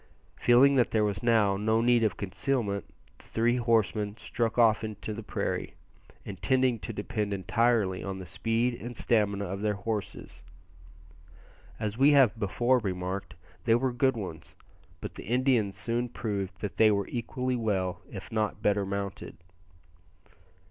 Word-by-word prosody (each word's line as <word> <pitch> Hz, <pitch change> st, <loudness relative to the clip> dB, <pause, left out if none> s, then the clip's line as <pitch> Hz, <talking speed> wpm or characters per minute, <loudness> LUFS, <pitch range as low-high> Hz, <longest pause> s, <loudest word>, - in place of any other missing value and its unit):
Feeling 135 Hz, +3 st, +5 dB
that 125 Hz, -, +3 dB
there 110 Hz, -1 st, +2 dB
was 100 Hz, -2 st, -1 dB
now 110 Hz, -4 st, +3 dB
no 110 Hz, +2 st, +1 dB
need 120 Hz, 0 st, +3 dB
of 105 Hz, -6 st, 0 dB
concealment, 100 Hz, +1 st, -2 dB, 0.3 s
the -, -, -18 dB
three 120 Hz, +2 st, +1 dB
horsemen 110 Hz, -3 st, +1 dB
struck 115 Hz, 0 st, -2 dB
off 115 Hz, -2 st, +4 dB
into 110 Hz, 0 st, -5 dB
the 105 Hz, -, -7 dB
open 110 Hz, -, -9 dB
prairie, -, -, -3 dB, 0.5 s
intending 120 Hz, +6 st, +1 dB
to 115 Hz, -, -5 dB
depend 105 Hz, 0 st, -3 dB
entirely 100 Hz, 0 st, +1 dB
on 95 Hz, -1 st, -4 dB
the 95 Hz, -, -8 dB
speed 115 Hz, +6 st, 0 dB
and 120 Hz, 0 st, -6 dB
stamina 100 Hz, -3 st, +1 dB
of 95 Hz, +1 st, -5 dB
their 105 Hz, -1 st, 0 dB
horses. 105 Hz, 0 st, -5 dB, 1.4 s
As 110 Hz, +1 st, -3 dB
we 145 Hz, +2 st, +6 dB
have 125 Hz, -6 st, +5 dB
before 120 Hz, +5 st, +2 dB
remarked, 95 Hz, -1 st, -4 dB, 0.3 s
they 115 Hz, -1 st, +5 dB
were 130 Hz, +1 st, 0 dB
good 130 Hz, 0 st, +2 dB
ones; 90 Hz, -7 st, -7 dB, 0.5 s
but -, -, -6 dB
the -, -, -9 dB
Indians 120 Hz, -5 st, +1 dB
soon 120 Hz, +5 st, -2 dB
proved 100 Hz, -5 st, -4 dB
that 105 Hz, -, -5 dB
they 110 Hz, -, +6 dB
were 100 Hz, -2 st, +1 dB
equally 125 Hz, +1 st, -2 dB
well 95 Hz, -6 st, -1 dB
if -, -, -9 dB
not 110 Hz, -1 st, -1 dB
better 100 Hz, -2 st, +2 dB
mounted. 100 Hz, -1 st, -5 dB
110 Hz, 155 wpm, -28 LUFS, 100-120 Hz, 1.4 s, we